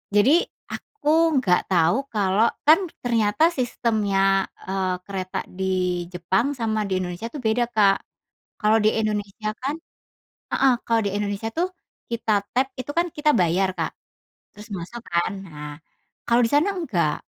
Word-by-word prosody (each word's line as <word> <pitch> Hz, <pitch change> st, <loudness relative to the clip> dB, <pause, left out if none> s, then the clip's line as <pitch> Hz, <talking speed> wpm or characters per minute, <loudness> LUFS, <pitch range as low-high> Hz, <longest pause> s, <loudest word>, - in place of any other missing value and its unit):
Jadi 275 Hz, +12 st, +5 dB, 0.2 s
aku 425 Hz, -9 st, -5 dB, 0.3 s
nggak 180 Hz, -5 st, +1 dB
tahu 170 Hz, +2 st, +4 dB
kalau 205 Hz, 0 st, +2 dB, 0.2 s
kan, 320 Hz, +5 st, +8 dB, 0.2 s
ternyata 230 Hz, +5 st, +3 dB
sistemnya, 210 Hz, -, +1 dB, 0.2 s
eee, 190 Hz, -1 st, 0 dB
kereta 190 Hz, -2 st, -4 dB
di 190 Hz, +1 st, -5 dB, 0.5 s
Jepang 190 Hz, +9 st, 0 dB
sama 220 Hz, -5 st, -1 dB
di 190 Hz, -2 st, -1 dB
Indonesia 185 Hz, +5 st, -5 dB
tuh 295 Hz, -, -6 dB
beda, 235 Hz, 0 st, +1 dB
Kak. 205 Hz, -4 st, +4 dB, 0.6 s
Kalau 215 Hz, +1 st, +4 dB
di 215 Hz, -, +5 dB
Indonesia 215 Hz, -1 st, -2 dB
kan 280 Hz, +3 st, -1 dB, 0.8 s
heeh, 270 Hz, -2 st, +4 dB
kalau 230 Hz, -1 st, +2 dB
di 200 Hz, -, +1 dB
Indonesia 205 Hz, +2 st, -2 dB
tuh 350 Hz, +3 st, 0 dB, 0.4 s
kita 215 Hz, -3 st, 0 dB
tap 260 Hz, +2 st, +2 dB
itu 255 Hz, +3 st, -4 dB
kan 345 Hz, +1 st, +3 dB
kita 300 Hz, 0 st, +2 dB
bayar, 185 Hz, -1 st, +2 dB
Kak, -, -, -1 dB, 0.6 s
terus 210 Hz, +1 st, -11 dB
masuk 185 Hz, +7 st, -7 dB
kan. 170 Hz, +4 st, 0 dB, 0.2 s
Nah, 150 Hz, -2 st, -8 dB, 0.6 s
kalau 235 Hz, +1 st, +4 dB
di -, -, 0 dB
sana 335 Hz, +8 st, +3 dB
nggak. 185 Hz, -, 0 dB
215 Hz, 145 wpm, -23 LUFS, 190-245 Hz, 0.8 s, kan